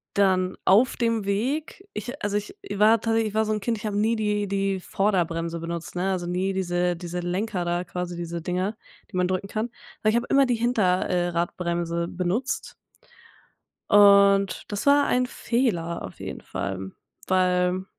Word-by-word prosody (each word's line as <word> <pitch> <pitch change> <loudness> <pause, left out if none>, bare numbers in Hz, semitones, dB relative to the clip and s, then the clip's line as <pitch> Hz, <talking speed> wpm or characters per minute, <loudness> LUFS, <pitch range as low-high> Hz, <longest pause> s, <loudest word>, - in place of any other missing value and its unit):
dann 185 -2 +2
auf 215 +7 +4
dem 230 -3 0
Weg 275 - -2
ich 245 +7 -6
also, 205 0 0
ich 210 0 -4 0.2
war 210 +2 +4
tatsächlich 225 -1 0
so 215 0 +1
'n 215 - 0
Kind, 230 +3 -1
ich 210 - -12
habe 210 -2 -2
nie 220 +2 +2
die 210 -2 0
die 195 0 0
Vorderbremse 170 -4 -1
benutzt, 170 +1 -6
ne, 190 +2 0
also 180 -2 -2
nie 185 +2 0
diese 180 -1 0
diese 175 0 -6
Lenker 180 +2 -2
da, 175 0 0
quasi 180 0 -5
diese 170 0 -4
Dinger, 185 +5 -2 0.3
die 195 - -7
man 180 0 +2
drücken 185 +2 -2
kann, 220 +3 -3 0.3
aber 215 - +3
ich - - -1
habe 235 - 0
immer 275 0 +5
die 250 - +1
Hinter 220 -6 +1
äh, 175 -1 +1
Radbremse 170 0 -1
benutzt 185 +9 -2 1.2
und 200 -1 +6
das 205 +4 -4
war 285 0 +5
ein 250 0 +2
Fehler 225 -10 -1
auf - - -10
jeden - - -6
Fall, 95 -1 -5 0.4
weil 180 0 +2
195 Hz, 170 wpm, -25 LUFS, 175-215 Hz, 1.2 s, und